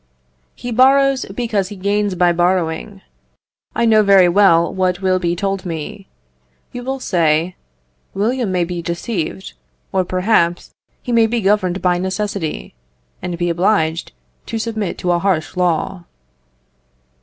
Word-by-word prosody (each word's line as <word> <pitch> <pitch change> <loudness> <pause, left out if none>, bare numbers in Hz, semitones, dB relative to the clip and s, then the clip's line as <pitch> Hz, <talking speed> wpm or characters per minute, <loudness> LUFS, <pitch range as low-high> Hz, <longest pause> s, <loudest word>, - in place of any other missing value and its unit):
He 245 - -6
borrows, 270 +2 +4
because 205 -2 -2
he 205 - -8
gains 200 0 0
by 175 0 +3
borrowing. 175 +2 -1 0.7
I 235 - +2
know 220 -1 +5
very 195 -3 +6
well 175 -2 +4
what 185 -1 0
will 185 -1 +2
be 175 -1 -1
told 195 +1 -2
me. 170 +3 -6 0.6
You 245 - -6
will 265 +1 -3
say, 170 -4 +1 0.6
William 225 +1 0
may 180 -1 +1
be 175 0 -4
deceived, 170 +1 -4 0.4
or, 190 -1 +1
perhaps, 185 -2 0 0.3
he 245 - -4
may 230 -1 +4
be 235 +1 -1
governed 195 -3 +1
by 180 -1 +2
necessity, 190 -3 -3 0.5
and 175 -1 -4
be 175 0 0
obliged 170 -2 0 0.4
to 230 - -3
submit 220 -3 -3
to 180 - -1
a 175 - +2
harsh 180 -4 -1
law. 180 0 -1
190 Hz, 140 wpm, -18 LUFS, 175-210 Hz, 0.7 s, very